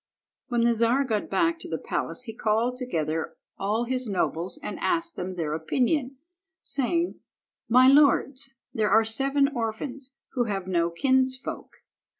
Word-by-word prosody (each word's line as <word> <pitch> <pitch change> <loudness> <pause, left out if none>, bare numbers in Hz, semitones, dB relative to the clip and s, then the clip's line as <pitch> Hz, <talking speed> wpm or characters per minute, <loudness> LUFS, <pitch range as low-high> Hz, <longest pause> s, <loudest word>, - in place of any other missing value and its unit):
When 240 -2 +1
the 235 0 +4
Czar 235 +4 +3
got 220 -6 -2
back 335 -1 +1
to - - -8
the - - -2
palace - - -3
he 225 -3 -7
called 225 +3 0
together 165 - -2 0.2
all 210 +4 0
his 255 -1 -2
nobles 175 -2 -1
and - - -5
asked 335 -1 0
them 185 +1 -5
their 160 -4 -2
opinion, 255 - 0 0.5
saying— 335 +6 -1 0.5
"My 255 +2 +7
lords, 275 -1 +4 0.2
there 215 -1 +1
are 220 +3 +5
seven 275 +5 +2
orphans 255 +2 -4
who 245 -3 0
have 195 -4 -3
no 170 -2 +1
kinsfolk. 260 +7 -1
240 Hz, 150 wpm, -26 LUFS, 210-270 Hz, 0.5 s, My